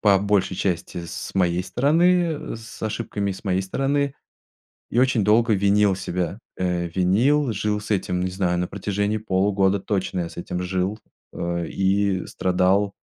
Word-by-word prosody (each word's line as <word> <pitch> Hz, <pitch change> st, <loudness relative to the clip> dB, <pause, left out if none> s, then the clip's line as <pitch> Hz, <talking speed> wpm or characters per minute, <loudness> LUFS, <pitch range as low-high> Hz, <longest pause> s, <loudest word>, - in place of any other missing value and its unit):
по 100 Hz, -2 st, +5 dB
большей 100 Hz, -1 st, +1 dB
части, 90 Hz, -2 st, -2 dB
с 80 Hz, -, -7 dB
моей 90 Hz, -1 st, +2 dB
стороны, 165 Hz, -, +2 dB
э, -, -, -5 dB
с 115 Hz, 0 st, -11 dB
ошибками 105 Hz, -2 st, -2 dB
с 95 Hz, -, -11 dB
моей 95 Hz, -1 st, +1 dB
стороны, 140 Hz, +7 st, 0 dB, 0.8 s
и 120 Hz, -, 0 dB
очень 130 Hz, -3 st, +3 dB
долго 110 Hz, +3 st, +4 dB
винил 100 Hz, 0 st, +3 dB
себя. 90 Hz, +1 st, -3 dB, 0.2 s
Э, 90 Hz, -1 st, -1 dB
винил, 115 Hz, -, +2 dB
жил 105 Hz, +1 st, -1 dB
с 105 Hz, +1 st, -3 dB
этим, 90 Hz, -2 st, -1 dB
не 95 Hz, -, -1 dB
знаю, 90 Hz, -2 st, 0 dB
на 90 Hz, -, 0 dB
протяжении 100 Hz, +2 st, -2 dB
полугода 100 Hz, -1 st, +1 dB
точно 95 Hz, -2 st, -2 dB
я 85 Hz, -, -2 dB
с -, -, -14 dB
этим 90 Hz, +1 st, -4 dB
жил, 95 Hz, +3 st, -1 dB, 0.3 s
э, 85 Hz, -1 st, -2 dB
и 95 Hz, -1 st, +1 dB
страдал, 95 Hz, +2 st, +1 dB
100 Hz, 160 wpm, -23 LUFS, 90-110 Hz, 0.8 s, по